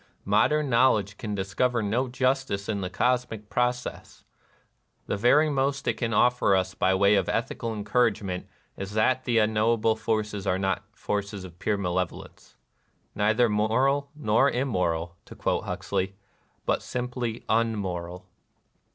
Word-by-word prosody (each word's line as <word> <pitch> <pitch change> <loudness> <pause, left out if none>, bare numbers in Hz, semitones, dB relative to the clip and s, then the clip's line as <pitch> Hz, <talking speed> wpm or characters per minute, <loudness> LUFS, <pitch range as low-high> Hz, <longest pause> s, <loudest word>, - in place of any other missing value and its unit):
Modern 140 +9 +3
knowledge 115 -5 +2
can 105 -3 -3
discover 100 +6 0
230 105 -2 -2
NIRVANA 125 +4 +1
no - - -10
justice 130 -6 0
in 105 -3 -2
the 90 - -3
cosmic 115 0 -1
process; 125 +2 -2 0.4
— - - -45
the - - -2
very 125 +9 +4
most 140 -1 -1
it - - +1
can 115 -2 -2
offer 120 -3 +3
ns 95 +1 -3
by 95 -2 +2
way 100 +2 +4
of 95 -3 +2
ethical 115 - -2
encour 110 +4 +2
agement 95 -3 -5 0.3
is 100 +1 -6
that 130 +4 +2
the 120 -2 +1
unknowable 110 +1 +2
forces 105 -2 -2
are 90 - +2
not 95 0 -1
forces 100 -3 -3
of 90 -1 -12
pure 105 0 0
malevolence. 90 -2 -4 0.3
" - - -43
Neither 110 +4 +3
moral 130 +7 +1
nor 135 -1 +3
immoral," 90 -10 -1
to - - -12
quote - - -1
Huxley, 95 +1 -2 0.3
" - - -41
but - - +1
simply 125 -2 -4
unmoral." 95 -6 -1
110 Hz, 155 wpm, -26 LUFS, 100-125 Hz, 0.4 s, very